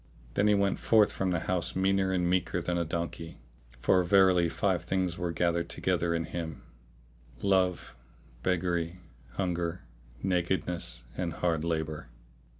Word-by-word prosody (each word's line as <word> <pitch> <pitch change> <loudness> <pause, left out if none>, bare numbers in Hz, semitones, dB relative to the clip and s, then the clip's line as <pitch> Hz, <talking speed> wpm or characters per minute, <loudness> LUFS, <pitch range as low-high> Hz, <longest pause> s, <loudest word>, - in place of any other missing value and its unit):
Then 105 - +2
he 105 - +5
went 100 -1 +1
forth 110 -2 +4
from 95 - -1
the 85 -2 0
house 90 -1 0
meaner 95 0 +2
and 90 -2 +1
meeker 90 -1 +1
than 90 0 -2
a 85 - +1
donkey, 85 0 -4 0.4
for 90 +9 +3
verily 90 -2 +4
five 90 -1 0
things 90 -2 0
were 90 -1 -2
gathered 85 0 0
together 85 -2 0
in 85 - 0
him 80 -3 -6 0.7
viz.: - - -19
love, 95 -6 +1 0.5
beggary, 90 -1 0 0.4
hunger, 90 -2 -2 0.4
nakedness 90 -3 0
and 85 -3 -2
hard 85 -3 0
labour. 80 -5 -3
90 Hz, 145 wpm, -29 LUFS, 85-95 Hz, 0.7 s, he